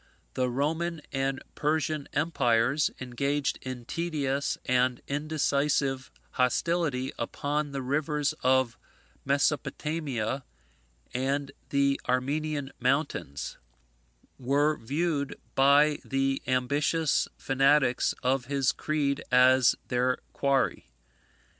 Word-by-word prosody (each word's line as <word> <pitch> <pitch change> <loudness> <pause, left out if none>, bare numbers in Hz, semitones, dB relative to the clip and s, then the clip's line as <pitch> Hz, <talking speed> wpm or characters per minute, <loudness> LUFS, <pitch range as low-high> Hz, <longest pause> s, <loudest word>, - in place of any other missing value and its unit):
The 130 -1 0
Roman 160 +5 -1
and 135 0 -1
Persian 155 -1 -1
empires, 140 -3 +2
engaged 140 +3 -1
in 130 -2 -6
tedious 145 -4 -1
and 125 0 +2
indecisive 140 -2 0 0.2
hostility 135 +1 0
upon 145 0 -2
the 135 -1 -4
rivers 145 +2 0
of 130 -2 +2 0.5
Mesopotamia 140 -3 -1 0.7
and 135 +2 -1 0.2
the 140 0 +2
Armenian 145 +2 -1
mountains, 130 - -1 0.8
were 145 +4 +2
viewed 145 +3 -2
by 145 +2 +5
the 135 0 0
ambitious 140 +5 +1
fanatics 135 -1 +2
of 130 0 +1
his 140 -1 +1
creed 140 -1 -1
as 130 0 +6
their 125 0 +1 0.2
quarry. 140 - 0
140 Hz, 90 wpm, -28 LUFS, 130-150 Hz, 0.8 s, as